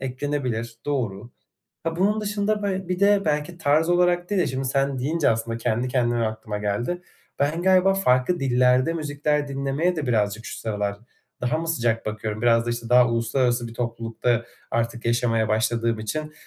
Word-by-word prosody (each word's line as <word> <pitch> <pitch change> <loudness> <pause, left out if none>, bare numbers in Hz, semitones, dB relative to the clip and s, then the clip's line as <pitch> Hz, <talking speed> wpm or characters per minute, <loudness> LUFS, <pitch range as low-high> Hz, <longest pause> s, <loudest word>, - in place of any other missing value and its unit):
Eklenebilir, 130 -3 -3
doğru. 120 -6 -2 0.5
Ha, 165 0 -2
bunun 205 +4 +2
dışında 210 0 -1
be 190 -2 -2
bir 180 0 -2
de 200 0 +4
belki 155 +2 -1
tarz 155 +2 +2
olarak 175 0 +2
değil 200 -2 +2
de, - - +2
şimdi 130 +1 -3
sen 135 +1 0
deyince 150 +4 +1
aslında 115 +1 -1
kendi 115 +2 -1
kendime 120 -2 +1
aklıma 110 -1 -4
geldi. 120 - -2 0.4
Ben 150 +4 0
galiba 190 +1 +4
farklı 130 -2 +2
dillerde 125 +2 +3
müzikler 150 -2 -1
dinlemeye 140 +6 -1
de 150 -4 -2
birazcık 105 -2 0
şu - - -6
sıralar 105 -2 -2 0.4
daha 125 +5 0
mı 165 +1 -4
sıcak 115 -8 0
bakıyorum, 110 0 -4
biraz 115 -1 +3
da, - - 0
işte, 120 0 -4
daha 125 0 +6
uluslararası 120 +1 0
bir 115 - -11
toplulukta 115 0 -1 0.3
artık 115 0 -2
yaşamaya 115 -2 +1
başladığım 115 +1 +1
için, 150 +8 -4
125 Hz, 170 wpm, -24 LUFS, 115-160 Hz, 0.5 s, daha